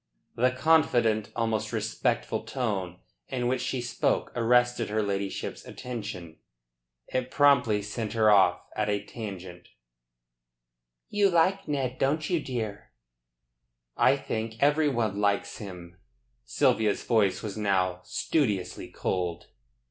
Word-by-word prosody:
The 125 +2 +3
confident, 125 -7 +2
almost 110 -2 -1
respectful, 110 +1 -1
tone 105 -7 -3 0.3
in 125 -2 -2
which 125 +1 0
she 130 - -2
spoke 120 - 0
arrested 120 0 +2
her 110 0 0
ladyship's 100 -1 -3
attention. 100 -9 -7 0.7
It 130 0 -2
promptly 125 -8 +4
sent 105 +2 -4
her 110 -2 +4
off 95 -3 +5
at 105 -1 0
a 100 -1 0
tangent: 95 -6 -8 1.4
"You 205 -1 +3
like 185 +3 +2
Ned, 135 -4 -2
don't 155 +5 0
you, 175 - +2
dear?" 115 -8 -5 1.1
"I - - +4
think 110 0 -4
everybody 140 -8 +2
likes 100 -1 0
him." 90 -4 -9 0.5
Sylvia's 105 - +1
voice 105 -5 +2
was 105 -3 -4
now 95 -4 0
studiously 105 - -1
cold. 90 -2 -3
110 Hz, 115 wpm, -28 LUFS, 100-125 Hz, 1.4 s, off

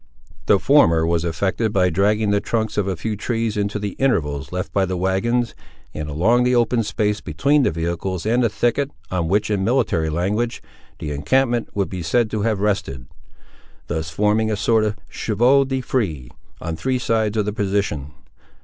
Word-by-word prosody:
The - - +6
former 80 0 +4
was 85 0 +1
effected 95 +6 -1
by 90 -3 +2
dragging 105 +4 +2
the 100 0 +2
trunks 110 0 -2
of 105 -2 0
a 95 - -1
few 105 +6 -3
trees 115 +1 -2
into 105 0 -1
the 105 -1 -3
intervals 75 - 0
left 90 0 -4
by 100 - +2
the 90 0 -2
wagons, 105 +6 0 0.4
and 75 0 -5
along 100 +12 +2
the 125 0 +2
open 120 0 +2
space 105 -1 -1
between 140 - +2
the 130 - +3
vehicles 85 +3 -3
and 120 +3 +2
the 115 - +3
thicket, 120 +6 0 0.2
on 90 -3 -1
which, 105 +4 +1
in 100 -2 0
military 110 -9 +1
language, 100 +9 -1 0.4
the 75 - -5
encampment 120 - +1
would 100 -2 0
be 90 -2 -5
said 110 +8 +1
to 110 - -1
have 105 -2 0
rested; 95 - -1 0.8
thus 80 +1 -3
forming 105 +6 +1
a 110 - 0
sort 110 +2 +2
of 105 -1 -2
chevaux 125 +6 +2
de 130 0 -2
frise 90 - -2 0.3
on 80 0 -4
three 130 +9 -1
sides 110 -3 0
of 105 - +1
the 105 - -2
position. 95 -9 -1
105 Hz, 185 wpm, -21 LUFS, 85-115 Hz, 0.8 s, The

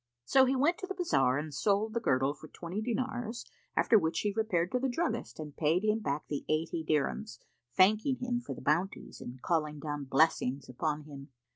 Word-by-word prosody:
So 265 - +5
he 265 +1 +1
went 300 +7 +2
to 375 - -5
the 385 - -4
bazar 135 - +2
and 150 +1 -4
sold 210 +7 +1
the 235 - +1
girdle 135 - +2
for 150 +1 -13
twenty 175 +6 -5
dinars, 245 0 -3 0.3
after 220 - +5
which 160 -2 0
he 205 -1 0
repaired 185 -6 0
to 250 - +1
the 265 +1 0
druggist 325 - -2
and 150 -2 -7
paid 165 +5 +2
him 215 +1 +2
back 150 -7 -3
the 145 - -3
eighty 160 +1 0
dirhams, 155 +8 -1 0.4
thanking 215 +8 +4
him 245 -1 -2
for - - -6
the - - -10
bounties 170 +6 -1
and 125 +1 -8
calling 155 -3 0
down 145 -1 -4
blessings 135 -1 +2
upon 150 +4 -2
him. 140 -2 -10
170 Hz, 195 wpm, -31 LUFS, 150-230 Hz, 0.4 s, So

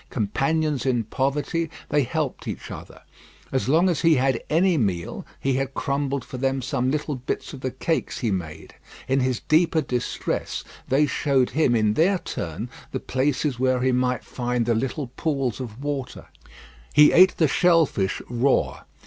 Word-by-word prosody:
Companions 135 +6 0
in 125 -3 +1
poverty, 145 +8 -1 0.2
they 145 0 +3
helped 140 +1 -3
each - - -6
other. - - -10 0.5
As 130 -1 0
long 165 +6 +4
as 175 -4 0
he 165 -1 +5
had 135 0 +2
had 115 - -6
any 175 +3 +3
meal, 95 - -2
he 135 - 0
had 135 0 -3
crumbled 140 -1 -1
for 130 - -7
them 135 +1 0
some 130 0 0
little 150 +1 -1
bits 130 +3 -4
of 135 - -9
the 130 - -1
cakes 160 +6 -2
he 115 -4 -1
made. 80 -5 -5 0.3
In 135 +1 +2
his 130 -2 0
deeper 160 +1 +3
distress 125 -5 -2 0.2
they 140 +3 +3
showed 135 -3 +1
him 145 -5 +2
in 110 -2 +2
their 185 - +3
turn 90 - -5 0.2
the - - -2
places 130 0 -1
where 130 -1 +2
he 130 0 +2
might 125 0 0
find 125 -1 -2
the 120 - +2
little 130 +3 -2
pools 135 -7 -1
of 125 0 -7
water. 140 -3 -4 0.6
He 150 0 +7
ate 185 +2 +6
the 160 - +4
shell 165 +2 +4
fish 95 -7 -2
raw. 125 +3 0
135 Hz, 175 wpm, -24 LUFS, 125-150 Hz, 0.6 s, He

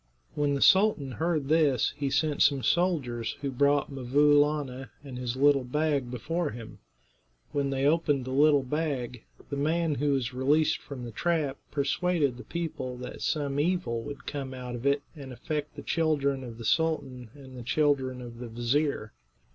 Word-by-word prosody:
When 145 -1 +1
the 140 - +2
sultan 190 -9 +4
heard 160 0 -1
this 150 -5 +3
he 140 -1 -2
sent 150 +1 0
some 140 -3 +4
soldiers 135 -11 0
who 140 -1 -2
brought 140 +2 +2
'Mvoo 140 +3 +3
Laana 145 -3 -1
and 135 -3 -8
his 125 -1 -3
little 140 0 +4
bag 145 0 0
before 155 +7 -2
him. 115 -3 -9 0.7
When 140 -1 0
they 135 0 0
opened 145 -4 +2
the 130 - -5
little 145 +1 +4
bag, 130 -4 -3 0.3
the 140 - -2
man 160 +2 +1
who 145 +1 +1
was 130 -2 -1
released 150 +5 +2
from 130 -4 -8
the 120 - -7
trap 150 +1 0
persuaded 145 -1 0
the 125 - -9
people 150 -7 -4
that 125 0 -8
some 145 -2 -1
evil 150 -8 0
would 140 +4 -8
come 135 -2 -5
out 125 -1 -6
of 120 +3 -3
it, 140 +1 +2
and 140 -3 -9
affect 150 +5 -4
the - - -8
children 140 -5 0
of 115 -2 -8
the 115 - -8
sultan 135 -6 0
and 135 -2 -12
the 125 - -7
children 130 -1 0
of 120 -1 -10
the 120 - -6
vizir. 120 0 -1
140 Hz, 175 wpm, -28 LUFS, 125-150 Hz, 0.7 s, sultan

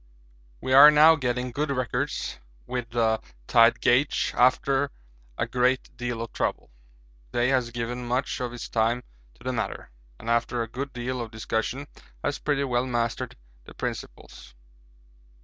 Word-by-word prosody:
We 130 - -1
are 140 +3 +11
now 150 +2 +7
getting 125 -3 -2
good 150 +4 -2
records 130 - -2 0.3
with 125 -2 -4
the 115 -2 +1 0.2
tide 115 - +5
gauge 125 +4 +2
after 135 +2 +3 0.5
a - - 0
great 125 +1 0
deal 120 -2 -3
of 115 - -9
trouble. - - -2 0.6
Day 120 +1 +1
has 130 -3 +1
given 120 +1 -4
much 125 +4 -1
of 125 -1 -3
his 120 - -7
time 115 +2 +1 0.3
to - - -19
the 130 0 -2
matter, 110 - -4 0.3
and 115 - -12
after 115 0 +1
a - - -6
good 135 +4 -5
deal 125 0 -3
of 115 - -5
discussion 110 +5 -3 0.4
has 145 - -1
pretty 145 -2 0
well 125 -1 0
mastered 120 -2 -2 0.3
the - - -13
principles. - - -7
125 Hz, 150 wpm, -26 LUFS, 115-130 Hz, 0.6 s, are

